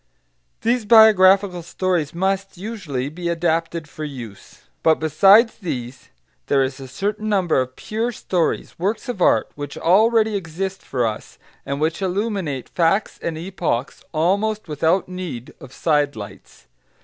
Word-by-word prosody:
These 235 -1 +1
biographical 200 -4 +6
stories 175 -3 -1
must, 190 +2 -2
usually, 180 - -4
be 170 +4 -4
adapted 165 -1 -1
for 155 - -8
use. 125 -9 -9 0.2
But 160 -1 +4
besides 195 - +4
these 130 - -6 0.4
there 135 -1 +3
is 130 +1 -4
a 135 - -8
certain 205 - -3
number 185 -9 +2
of 130 0 -5
pure 225 +3 -3
stories 180 -8 -2
works 205 +8 -2
of 245 -7 -4
art - - +3
which 145 -1 -7
already 220 +4 +3
exist 190 +1 -4
for 125 -3 -1
us, 105 - -5 0.3
and 140 +1 -2
which 160 +4 -1
illuminate 190 - -2
facts 180 +5 +1
and 165 -2 -3
epochs 165 -7 -3
almost 200 +6 0
without 160 +4 +1
need 175 -10 -7
of 130 - -12
sidelights. 145 -8 -2
175 Hz, 135 wpm, -21 LUFS, 145-200 Hz, 0.4 s, biographical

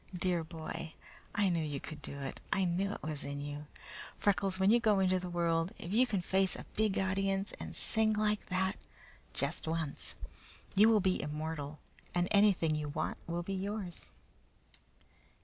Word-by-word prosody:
"Dear 175 -2 +1
boy! 160 0 -6 0.4
I 205 -2 +3
knew 170 -2 +1
you 145 -2 -3
could 155 +2 -8
do 140 - -6
it! 135 - -5
I 195 - +3
knew 185 +3 +1
it - - -8
was 150 -1 -3
in 140 0 -4
you! 145 +1 -5 0.5
Freckles, 195 -1 +2
when 190 +2 +5
you 240 - +6
go 215 -4 +4
into 185 -1 +3
the 180 0 -5
world, 170 0 +1
if 175 - -5
you 250 +4 +5
can 200 -6 0
face 190 +1 +2
a - - -7
big 215 -2 +2
audience 195 +1 +1
and - - -6
sing 220 -1 +2
like 210 0 +1
that, 190 0 +1 0.6
just - - -1
once, 160 -3 -2 0.6
you 210 +3 +7
will 215 -2 +5
be 185 -1 +2
immortal, 150 0 -4 0.4
and 175 0 +3
anything 200 -6 +5
you 150 -1 -1
want 155 +2 -2
will 170 +1 -2
be 195 - -3
yours." 195 -1 -4
185 Hz, 175 wpm, -34 LUFS, 160-195 Hz, 0.6 s, you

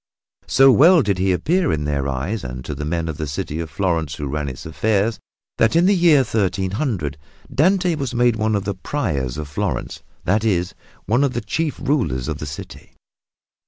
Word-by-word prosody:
So 135 0 +6
well 165 +4 +6
did 100 -4 0
he 95 0 +2
appear 165 - +1
in 75 -1 -1
their 70 -2 -1
eyes 80 +11 -3
and 65 0 -6
to - - -4
the 75 - -5
men 85 +1 -2
of 80 -2 -4
the 75 - -3
city 75 +2 -4
of 80 -1 -4
Florence 80 -3 -1
who 75 - -5
ran 75 +1 -2
its 65 - -9
affairs 105 +6 0 0.4
that 110 - +3
in 170 +1 +5
the 200 - +5
year 170 -6 +5
1300 95 - -1 0.3
Dante 180 +3 +3
was 135 -5 -3
made 120 -1 +3
one 110 0 0
of 100 - -1
the 100 - -1
Priors 85 - -3
of 75 -1 -5
Florence, 75 -3 -3 0.2
that 105 +4 +1
is, 90 -5 0 0.3
one 120 +7 +2
of 135 -3 +1
the 120 - -2
chief 150 +8 -2
rulers 115 - 0
of 80 -2 -3
the 75 - -5
city. 75 - -9
100 Hz, 195 wpm, -21 LUFS, -, 0.4 s, So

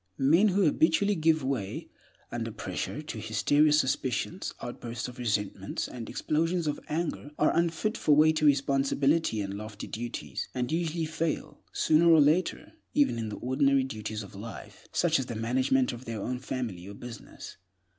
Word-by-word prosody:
Men 165 +10 +5
who 200 0 +2
habitually 165 +5 +3
give 160 -4 +2
way, 125 -8 -3 0.4
under - - -3
pressure, - - -4
to - - -6
hysterical 150 +1 +3
suspicions, 145 +4 0
outbursts 120 -1 -5
of 125 0 -10
resentment, 105 -4 -2
and 120 -2 -7
explosions 165 +3 0
of 150 -1 -1
anger, 155 -2 -2
are 150 - +3
unfit 170 +6 +1
for 150 - +4
weighty 155 +1 +4
responsibilities 140 -2 +2
and 100 - -5
lofty 105 0 -7
duties, 120 +2 -5
and 125 +2 -1
usually 165 0 -1
fail, 155 +1 -3
sooner 160 +2 +4
or 165 -1 +7
later, 155 +5 +2 0.2
even 285 - +3
in 110 -1 -3
the 105 - -5
ordinary 135 +1 +2
duties 110 -3 -5
of 100 - -12
life, 105 +4 -10
such 165 -3 +2
as 130 - -3
the 120 - -5
management 130 +3 +1
of 120 +2 -9
their 115 -2 -4
own 125 +5 -3
family 120 -9 -4
or 100 - -8
business. 120 0 -10
135 Hz, 160 wpm, -29 LUFS, 120-160 Hz, 0.4 s, or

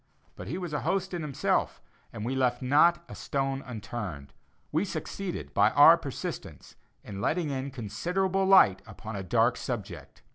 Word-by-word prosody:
But - - -9
he 160 - -3
was 175 -4 -5
a 150 - 0
host 190 -1 -1
in 175 - -3
himself, 150 -4 -1 0.3
and 110 -1 -6
we 125 - -2
left 125 -1 0
not 170 +6 +4
a - - -10
stone 135 -1 -2
unturned; 105 - -7 0.4
we 160 +5 +1
succeeded 195 -1 -5
by 105 +1 +4
our 145 +3 +9
persistence, 145 -6 -7 0.3
in 100 -1 -7
letting 160 - 0
in 135 0 -3
considerable 180 - -1
light 105 - +6
upon 110 0 -8
a 100 - -4
dark 115 +5 +2
subject. 120 -6 -6
135 Hz, 160 wpm, -28 LUFS, 110-170 Hz, 0.4 s, our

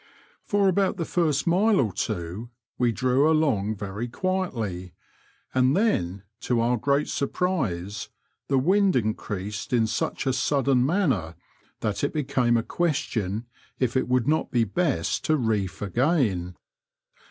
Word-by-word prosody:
For 205 -2 +2
about 190 0 +2
the 165 - -2
first 155 -6 +1
mile 195 +5 +3
or 110 -8 +1
two 95 +4 -4 0.3
we 120 -1 +3
drew 130 +6 +2
along 130 -10 +1
very 105 +3 -5
quietly, 115 - -3 0.6
and 130 +3 +3
then, 95 - 0 0.2
to 120 -2 0
our 120 +2 +2
great 140 +5 +1
surprise, 110 - -2 0.4
the 135 - +2
wind 190 +7 +3
increased 105 -3 -3
in 120 -3 +3
such 110 - -2
a 130 - +1
sudden 130 0 +2
manner 130 - 0 0.5
that 105 +2 -2
it 145 - 0
became 130 -5 +1
a 115 - 0
question 115 - -1 0.3
if 125 -1 0
it 130 - +1
would 125 -1 +1
not 155 +1 +1
be 120 -3 +2
best 140 - -1
to 155 - +3
reef 105 -6 -1
again. 105 - 0
125 Hz, 140 wpm, -25 LUFS, 105-155 Hz, 0.6 s, mile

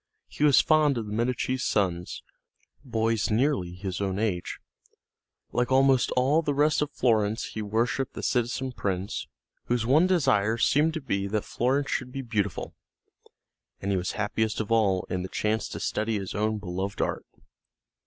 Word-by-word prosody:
He - - -4
was 145 -3 +6
fond 155 -4 +3
of 115 - -3
the 105 - -6
Medici's 125 +3 -1
sons, 90 -4 -1 0.6
boys 115 -4 0
nearly 110 -6 +1
his 95 +1 -5
own 95 -1 -1
age; 100 -5 -2 0.9
like 120 +1 0
almost 135 -2 +4
all 140 +6 +3
the 145 -3 -1
rest 150 +2 +3
of 150 - 0
Florence 110 -4 +1
he 110 - -5
worshiped 115 +5 -1
the - - -6
citizen 125 +2 0
prince 95 -4 -3 0.4
whose 120 -2 0
one 150 +9 +4
desire 115 - +2
seemed 150 +6 +2
to 160 - -3
be 100 -7 -1
that 105 +1 -2
Florence 135 +4 0
should 125 -1 -2
be 135 +1 -5
beautiful; 105 -7 -2 1.1
and 100 - -2
he 95 - +2
was 90 0 -2
happiest 105 +1 -1
of 110 0 -3
all 100 -5 +2
in 90 - -2
the 95 - -5
chance 110 +3 -1
to - - -6
study 110 +1 -1
his 95 -2 -5
own 110 +1 0
beloved 95 0 -4
art. - - -2
110 Hz, 165 wpm, -27 LUFS, 100-130 Hz, 1.1 s, was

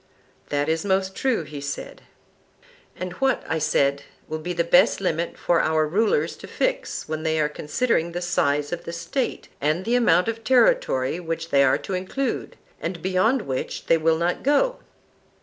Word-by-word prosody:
That 145 0 0
is 160 0 0
most 190 -1 0
true, 255 -10 0
he 150 -2 -8
said. 145 0 -6 0.9
And 180 -1 -5
what, 270 0 +2
I 160 0 -1
said, 140 -2 +2 0.3
will 155 0 -4
be 175 +3 -4
the 170 -1 +1
best 180 +5 +4
limit 170 -3 -2
for 170 -1 +2
our 155 0 +2
rulers 170 -3 +1
to - - -10
fix - - -2
when 155 0 -3
they 160 0 0
are 150 - +3
considering 165 +4 -1
the 175 - -3
size 145 -3 0
of 175 - -5
the 170 - -5
State 170 +10 -3
and 155 +6 0
the 235 - 0
amount 235 -6 +4
of 225 0 -3
territory 245 - +3
which 165 -1 -4
they 140 0 +5
are 130 - +4
to 195 - -6
include, 190 +9 -3 0.2
and 175 - -4
beyond 205 +7 +2
which 130 -1 -4
they 165 - +4
will 160 0 +2
not 170 +2 -1
go? 390 - +2
170 Hz, 180 wpm, -24 LUFS, 155-210 Hz, 0.9 s, they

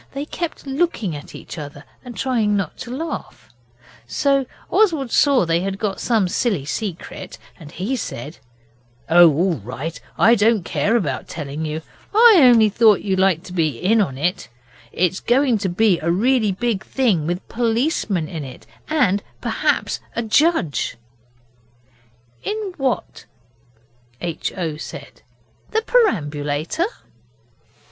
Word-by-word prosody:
They 280 +1 -4
kept 335 0 -5
looking 270 - -1
at 145 - -10
each - - -9
other 145 0 -8 0.2
and 245 -2 -9
trying 225 -6 +1
not 195 - -3
to 245 - -8
laugh, 290 - -6 0.6
so 275 - +1 0.2
Oswald 320 - +2
saw 275 -9 +4
they 165 0 +1
had 195 +2 -3
got 200 -2 -2
some 220 -6 +2
silly 185 - -1
secret 185 +3 -5 0.2
and 150 -3 -11
he 205 +12 -2
said 150 - -6 0.7
'Oh, 175 0 +8
all 175 +5 +1
right! 130 +9 -6 0.2
I 230 - +6
don't 220 -2 +3
care 225 - 0
about 145 - -1
telling 150 0 -5
you. 155 +1 -4 0.3
I 450 -2 +8
only 240 -5 +7
thought 215 0 +4
you'd 190 -2 0
like 190 -3 +2
to 180 - -10
be 155 -8 0
in 215 - +3 0.2
it. 175 - -2 0.4
It's 185 +1 0
going 245 -2 +2
to 195 -2 -1
be 190 0 +2
a 165 - -2
really 220 +4 +2
big 210 +1 -1
thing, 205 - 0
with 175 +2 -3
policemen 230 - 0
in 160 -3 -6
it, 130 -2 -10 0.2
and 240 -11 +2 0.2
perhaps - - 0 0.2
a 235 - -1
judge.' 225 - +1 1.5
'In 420 -3 -3
what?' 265 -3 -2 0.9
H. 170 -2 -3
O. 160 -4 -3
said; - - -9 0.5
'the 445 0 0
perambulator? 155 - +1
200 Hz, 140 wpm, -21 LUFS, 165-255 Hz, 1.5 s, Oh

